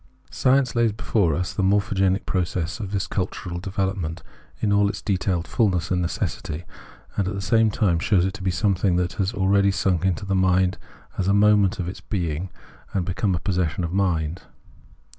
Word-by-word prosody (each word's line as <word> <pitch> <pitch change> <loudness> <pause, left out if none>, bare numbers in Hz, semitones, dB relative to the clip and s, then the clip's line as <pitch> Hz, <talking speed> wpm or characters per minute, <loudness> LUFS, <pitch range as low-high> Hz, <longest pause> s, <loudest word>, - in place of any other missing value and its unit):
Science 130 -1 +2
lays 115 -2 +2
before 100 -6 +1
us 90 +2 -2
the - - -1
morphogenetic 95 -1 +2
process 90 -2 -2
of 100 -3 -5
this 95 -2 -1
cultural 90 -2 -3
development 95 -3 -3 0.4
in 105 -2 +1
all 100 0 +4
its - - -4
detailed 95 -3 -1
fullness 95 -7 +1
and 90 -1 +1
necessity, 85 -2 -3 0.5
and 100 - +1
at 100 - -3
the - - -3
same 115 +2 +3
time 95 -6 +1
shows 95 0 +2
it 95 - -2
to 105 - -9
be 95 - 0
something 95 -1 +1
that 90 0 0
has 95 +1 0
already 100 -1 +3
sunk 95 -2 +1
into 95 +1 0
the 100 - -1
mind 95 0 +2 0.4
as 95 - 0
a 100 - +3
moment 105 -2 +4
of 90 - -3
its 90 - -6
being 90 -2 -3 0.5
and 95 -3 +1
become 95 +2 0
a - - -2
possession 90 -2 -1
of 85 +1 -3
mind. 85 -4 0
95 Hz, 185 wpm, -23 LUFS, 90-100 Hz, 0.5 s, all